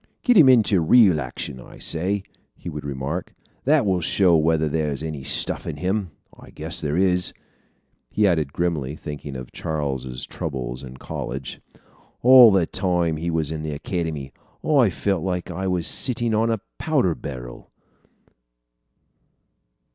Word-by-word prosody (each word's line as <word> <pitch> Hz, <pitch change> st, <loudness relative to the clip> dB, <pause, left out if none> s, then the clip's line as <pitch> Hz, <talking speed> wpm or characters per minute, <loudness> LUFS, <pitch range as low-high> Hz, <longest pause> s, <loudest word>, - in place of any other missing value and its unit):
"Get 245 Hz, -, +4 dB
him 155 Hz, -9 st, +8 dB
into 110 Hz, -7 st, +5 dB
real 90 Hz, -2 st, +5 dB
action, 65 Hz, 0 st, -6 dB
I -, -, -13 dB
say," 95 Hz, +5 st, -1 dB, 0.3 s
he 85 Hz, -, -8 dB
would 75 Hz, -1 st, -6 dB
remark. 70 Hz, +5 st, -4 dB, 0.3 s
"That 145 Hz, -2 st, +4 dB
will 95 Hz, -3 st, +1 dB
show 90 Hz, +1 st, +3 dB
whether 80 Hz, 0 st, +2 dB
there's 75 Hz, -2 st, -2 dB
any 75 Hz, -3 st, -5 dB
stuff -, -, 0 dB
in -, -, -4 dB
him. 95 Hz, +4 st, -1 dB, 0.3 s
I -, -, -15 dB
guess -, -, -4 dB
there 75 Hz, +2 st, -1 dB
is," 90 Hz, -1 st, +2 dB, 0.8 s
he 105 Hz, -, +1 dB
added 80 Hz, -7 st, +1 dB
grimly, 75 Hz, -5 st, -2 dB
thinking 75 Hz, -3 st, -7 dB
of 65 Hz, -1 st, -8 dB
Charles's 65 Hz, -5 st, -4 dB
troubles 65 Hz, -5 st, -5 dB
in 65 Hz, 0 st, -10 dB
college. 65 Hz, 0 st, -6 dB, 0.6 s
"All 125 Hz, -2 st, +9 dB
the 95 Hz, -3 st, +3 dB
time 90 Hz, -3 st, 0 dB
he 85 Hz, +2 st, -3 dB
was 80 Hz, -2 st, -1 dB
in 80 Hz, -1 st, -4 dB
the 75 Hz, -1 st, -4 dB
Academy, 75 Hz, -4 st, -4 dB, 0.3 s
I 135 Hz, -8 st, +4 dB
felt 95 Hz, -1 st, -1 dB
like 90 Hz, -2 st, -3 dB
I 95 Hz, +1 st, -3 dB
was 90 Hz, -3 st, 0 dB
sitting 120 Hz, -3 st, 0 dB
on 110 Hz, +2 st, +2 dB
a 115 Hz, -3 st, -1 dB, 0.2 s
powder 135 Hz, -, +1 dB
barrel." -, -, -9 dB
85 Hz, 150 wpm, -23 LUFS, 75-95 Hz, 0.8 s, All